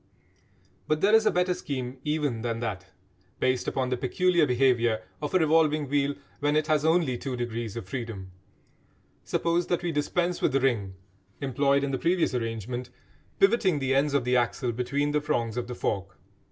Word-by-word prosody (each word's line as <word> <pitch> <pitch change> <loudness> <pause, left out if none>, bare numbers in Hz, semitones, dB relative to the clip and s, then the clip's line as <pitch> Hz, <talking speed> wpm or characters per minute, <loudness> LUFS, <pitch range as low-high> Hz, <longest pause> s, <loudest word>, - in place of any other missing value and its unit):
But 155 0 0
there 205 +2 +4
is 220 -1 +5
a - - +4
better 180 0 +1
scheme 130 -5 -5
even 150 -6 -1
than 115 -1 -2
that, 100 -5 -4 0.5
based 130 -1 +1
upon 130 -1 -1
the 125 - 0
peculiar 170 +6 +2
behaviour 120 -3 +2 0.2
of 150 +4 -3
a - - +8
revolving 155 -2 +3
wheel 140 +1 +1 0.2
when 145 +1 +1
it 155 0 +2
has 155 -1 +2
only 160 -6 +2
two 135 -2 -4
degrees 120 -2 -4
of 105 -5 -6
freedom. 105 -4 -6 0.9
Suppose 170 +1 0
that 175 -1 -1
we 175 - 0
dispense 175 +4 -1
with 140 - +1
the 135 - +3
ring 110 -8 0 0.4
employed 140 +1 +1
in 140 - -1
the 130 - -2
previous 175 -3 +1
arrangement, 120 +1 -3 0.5
pivoting 195 -5 +3
the 135 -1 0
ends 140 +1 +2
of 140 - +2
the 125 +1 +1
axle 120 0 +1
between 130 +5 -1
the 150 0 +1
prongs 115 -6 -1
of 120 -1 -3
the 125 - -5
fork. 95 -4 -3
135 Hz, 180 wpm, -27 LUFS, 120-155 Hz, 0.9 s, a